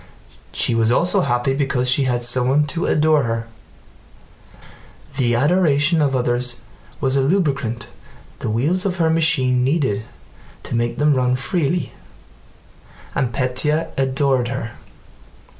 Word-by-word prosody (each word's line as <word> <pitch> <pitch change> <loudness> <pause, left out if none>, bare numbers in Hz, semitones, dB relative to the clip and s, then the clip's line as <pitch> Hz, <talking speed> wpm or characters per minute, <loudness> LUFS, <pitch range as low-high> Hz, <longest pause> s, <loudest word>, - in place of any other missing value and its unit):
She - - -1
was 115 -1 +2
also 170 +9 +2
happy 120 0 0
because 135 -2 -1
she 130 +2 +2
had 120 -1 0
someone 130 +4 +2
to 170 - -2
adore 155 0 +3
her: 115 -1 -3 1.7
the 120 -3 +1
adoration 150 +2 +2
of 140 -2 +1
others 125 0 -1 0.4
was 135 -1 0
a 135 - +3
lubricant 135 - -1 0.5
the - - -3
wheels 150 +12 0
of 190 -2 -2
her 165 -2 +2
machine 135 -6 +2
needed 130 -7 0 0.6
to - - -4
make 120 0 -1
them 150 0 +3
run 125 -1 +1
freely—and 135 - -5
Pétya 135 +5 -1
adored 135 -1 +1
her. 120 -2 -4
135 Hz, 125 wpm, -20 LUFS, 120-150 Hz, 1.7 s, adore